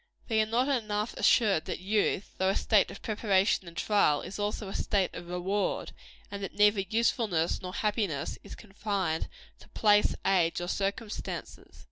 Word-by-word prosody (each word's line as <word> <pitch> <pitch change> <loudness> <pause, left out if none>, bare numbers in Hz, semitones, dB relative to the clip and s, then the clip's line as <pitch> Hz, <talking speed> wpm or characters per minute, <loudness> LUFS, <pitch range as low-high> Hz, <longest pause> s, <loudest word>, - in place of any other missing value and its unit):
They 220 -1 +3
are 215 - 0
not 240 +4 +1
enough 215 -5 -1
assured 205 -9 +3
that - - -3
youth, 200 +1 0
though 190 0 +2
a 195 - +1
state 210 -3 +3
of - - -10
preparation 200 -3 +1
and 170 0 -11
trial, 200 -9 +2
is 195 - -7
also 205 0 -2
a 195 - -6
state 195 -3 0
of 175 -1 -8
reward; 190 +3 -1 0.4
and 200 0 -5
that 195 - -6
neither 210 0 +4
usefulness 210 -4 0
nor 185 0 -6
happiness 205 -9 -1
is - - -9
confined 195 -6 -3 0.3
to - - -17
place, 210 -1 +3
age 180 -4 +2
or 175 0 -4
circumstances. 205 +3 -4
200 Hz, 165 wpm, -29 LUFS, 185-215 Hz, 0.4 s, neither